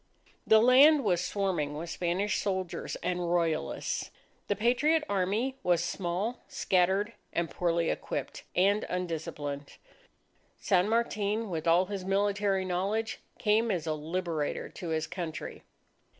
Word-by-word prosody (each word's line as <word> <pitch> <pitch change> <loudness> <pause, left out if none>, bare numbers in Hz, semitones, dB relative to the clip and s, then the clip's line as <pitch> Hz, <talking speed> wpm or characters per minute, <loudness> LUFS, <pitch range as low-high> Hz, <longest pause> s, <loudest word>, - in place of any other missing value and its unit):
The 220 - +7
land 270 +6 +7
was 180 -5 +2
swarming 180 -7 -1
with 165 +2 -5
Spanish 185 +4 0
soldiers 190 -3 -3
and 175 -1 -1
Royalists. 165 -3 -1 0.4
The 205 - +1
patriot 255 +9 +2
Army 205 +7 0
was 175 -1 +2
small, 185 +7 -2
scattered, 190 +4 +1 0.2
and 170 -1 -1
poorly 170 -1 +1
equipped, - - -4
and 200 +3 +3
undisciplined. 150 -5 -4 0.8
San 190 0 +2
Martin, 220 -2 0
with 160 -1 -3
all 170 +3 +5
his 195 -1 -5
military 195 0 +1
knowledge, 200 +5 -1 0.2
came 220 +2 +2
as 175 -6 -1
a 160 - 0
Liberator 160 0 -3
to 175 - -7
his 160 0 0
Country. 165 -2 -6
185 Hz, 125 wpm, -30 LUFS, 170-210 Hz, 0.8 s, The